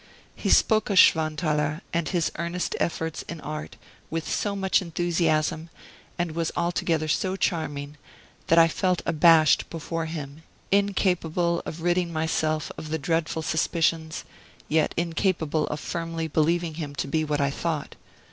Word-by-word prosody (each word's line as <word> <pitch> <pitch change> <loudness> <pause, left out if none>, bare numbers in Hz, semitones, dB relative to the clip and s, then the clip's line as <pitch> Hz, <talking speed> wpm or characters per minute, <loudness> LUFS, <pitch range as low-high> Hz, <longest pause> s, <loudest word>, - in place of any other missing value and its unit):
He - - -3
spoke 215 -1 +4
of 200 - +1
Schwanthaler, 155 -2 +3
and 170 -1 0
his 175 -4 0
earnest 170 +1 -2
efforts 160 -1 -2
in 170 - -5
art, 155 +1 -6 0.3
with 165 0 -3
so 205 -1 -1
much 190 -1 +2
enthusiasm, 165 -2 0 0.5
and 175 -1 -1
was 165 0 -2
altogether 170 -2 0
so 185 +5 0
charming, 150 -6 -2 0.5
that 165 - +4
I 165 0 +8
felt 180 +1 0
abashed 160 -1 +5
before 165 0 -4
him, 150 -2 -7 0.3
incapable 180 -4 +1
of 165 +1 -6
ridding 175 0 +1
myself 155 -1 -1
of 155 - -7
the 160 - -1
dreadful 160 +1 -1
suspicions, 160 0 0 0.4
yet 155 0 +1
incapable 165 -2 0
of 150 - -4
firmly 165 0 -3
believing 165 +2 +1
him 145 -2 -6
to 140 - -3
be 155 +3 0
what 150 -1 -1
I 140 -1 +1
thought. 160 0 -3
165 Hz, 145 wpm, -26 LUFS, 155-170 Hz, 0.5 s, I